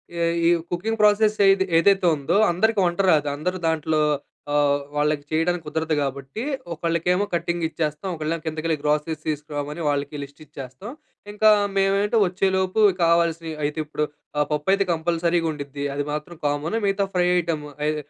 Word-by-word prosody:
ఈ - - -6 0.3
ఈ - - +6 0.2
cooking 215 +6 -2
process 210 0 +4
ఏది 195 0 +3
ఏదైతే 195 +2 +4
ఉందో 150 +5 -1 0.2
అందరికి 215 +4 +1
వంట 175 +1 -1
రాదు 150 -2 +2
అందరూ 180 +5 -2
దాంట్లో 160 -1 0 0.5
ఆహ్, 145 -1 +2
వాళ్ళకి 150 0 0
చేయడానికి 170 +2 0
కుదరదు 160 0 -1
కాబట్టి 140 +7 -4 0.3
ఒకళ్ళకేమో 170 +4 0
కటింగ్ 170 0 -1
ఇచ్చేస్తాం 155 +3 -3
ఒకళ్ళేమో 155 +1 -3
కిందకెళ్ళి 160 +1 -1
గ్రాసరీస్ 150 +1 -1
తీసుకురామని 150 +1 -4
వాళ్ళకి 145 0 -2
లిస్ట్ 140 +2 -13
ఇచ్చేస్తాం. 135 - -9 0.4
ఇంకా 215 +1 +4 0.3
మేమేంటి 200 +3 +2
వచ్చేలోపు 190 +2 0 0.2
కావాల్సినయి 165 -1 +1
అయితే 150 +2 -2
ఇప్పుడు 150 0 -3 0.3
ఆహ్, 150 - +3
పప్పు 150 +2 -2
అయితే 195 0 +2
కంపల్సరీగా 170 0 0
ఉండుద్ది 145 -1 -6
అది 145 - -2
మాత్రం 150 +3 -5
కామన్ 145 +8 -1
మిగతా 195 0 +1
ఫ్రై 180 - +3
ఐటెమ్ 160 -3 -3 0.2
అయ్ 155 0 +1
165 Hz, 150 wpm, -23 LUFS, 150-180 Hz, 0.5 s, ఈ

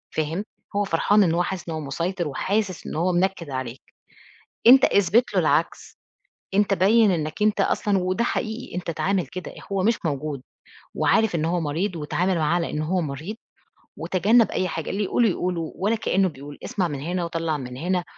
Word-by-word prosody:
فاهم؟ 160 +6 -1 0.3
هو 205 - +2
فرحان 200 +4 +3
إن 165 -2 +2
هو 175 - +2
حاسِس 180 -1 -5
إن 165 - -3
هو - - -3
مُسيطر، 170 +5 -2
وحاسِس 195 +5 -2
إن - - -5
هو 175 +3 +1
منكِد 175 -3 0
عليك، 130 -1 -5 0.9
أنت 260 +3 +9
اثبت 200 +6 +2
لُه - - +4
العكس، - - 0 0.6
أنت 205 0 +3
بيّن 210 +2 +4
إنك 155 +1 -3
أنت 210 0 +3
أصلًا 205 -2 +1
وده 185 +6 0
حقيقي 225 -3 -3
أنت 180 -1 -4
اتعامل 180 0 0
كده، 185 +6 -7 0.2
هو 190 -1 0
مش 225 +1 +2
موجود، 145 -2 -2 0.5
وعارف 220 -5 +2
إن 155 - -1
هو 170 +1 0
مريض، 165 +5 -2
واتعامل 175 +4 0
معاه 155 +1 +1
على 170 -1 0
إن 150 - -2
هو 180 +4 0
مريض، 160 +7 -5 0.6
وتجنب 215 +6 +3
أي 185 - 0
حاجة، 165 -3 -4
اللي 205 +2 -1
يقوله 225 +3 +2
يقوله، 175 -3 -2
ولا 210 +5 0
كأنه 195 -3 +1
بيقول 145 -1 -11
اسمع 185 -4 -1
من 145 -3 -5
هنا 175 +3 -2
وطلّع 165 -2 -2
من 125 -2 -7
هنا، 180 +4 -1
180 Hz, 185 wpm, -24 LUFS, 160-200 Hz, 0.9 s, أنت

